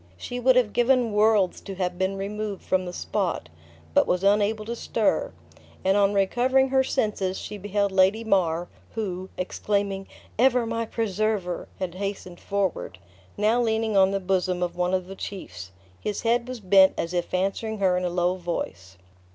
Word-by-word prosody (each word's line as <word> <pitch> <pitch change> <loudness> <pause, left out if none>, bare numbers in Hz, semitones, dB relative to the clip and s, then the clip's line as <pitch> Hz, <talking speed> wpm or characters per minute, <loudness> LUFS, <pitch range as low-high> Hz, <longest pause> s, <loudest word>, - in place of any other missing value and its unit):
She 245 - -5
would 255 +1 +4
have 235 -5 +3
given 245 -1 +3
worlds 210 -3 +3
to 195 - -7
have 180 -1 -2
been 190 +1 0
removed 205 0 -4
from 185 0 0
the 180 - -5
spot, 180 - -2 0.4
but - - +4
was 180 +1 0
unable 210 +2 +2
to 235 +2 -4
stir; - - 0 0.5
and 190 +1 +4
on 200 0 +3
recovering 255 +7 +3
her 265 0 +3
senses, 210 -7 -1
she 210 - -7
beheld 200 0 0
Lady 190 +4 +3
Mar 175 -5 +1 0.3
(who, 190 -4 -4
exclaiming, 195 +1 -2 0.3
"Ever 250 -1 +4
my 230 0 -2
preserver!" 210 -4 -1
had 185 -3 -4
hastened 190 -2 -5
forward), 195 - -2 0.4
now 220 +4 +3
leaning 220 -2 0
on 190 -1 +6
the 195 0 -1
bosom 185 -1 0
of 175 -1 -3
one 180 +1 +1
of 185 -1 -2
the 195 +1 -9
chiefs: 95 - -7 0.3
his 210 -1 -3
head 235 +1 +1
was 255 -3 -6
bent 190 0 +5
as 165 +1 -3
if 175 -1 -2
answering 195 +4 -1
her 190 -3 +2
in 180 - -1
a 180 - 0
low 180 +1 0
voice. 95 - -5
195 Hz, 175 wpm, -25 LUFS, 185-220 Hz, 0.5 s, on